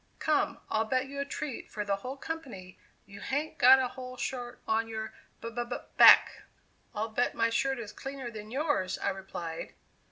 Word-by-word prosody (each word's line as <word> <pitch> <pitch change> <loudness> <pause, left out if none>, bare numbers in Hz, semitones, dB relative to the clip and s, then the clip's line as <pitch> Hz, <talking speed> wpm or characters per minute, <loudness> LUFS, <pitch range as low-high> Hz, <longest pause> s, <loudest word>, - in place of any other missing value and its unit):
Come, - - +1
I'll 220 +1 +1
bet 255 +3 0
you 280 0 -6
a 280 - -1
treat 280 -2 -5
for 210 -1 -4
the 200 -1 0
whole 255 +7 -6
company 260 - -7 0.3
you 200 0 -12
hain't 305 +3 -3
got 260 +2 +9
a 260 -2 0
whole 255 0 -8
shirt 245 -2 -4
on 225 +1 +1
your 220 -1 -5 0.3
b 230 - -5
b 240 +1 -2
b 240 +1 -5 0.2
back!" - - +8 0.5
"I'll 215 +2 -2
bet 230 +3 0
my 230 0 +2
shirt 270 +3 +1
is 215 -3 -7
cleaner 270 -1 -6
than 215 -1 -8
yours," 260 - 0
I - - -1
replied. 190 -4 -6
240 Hz, 190 wpm, -30 LUFS, 215-265 Hz, 0.5 s, got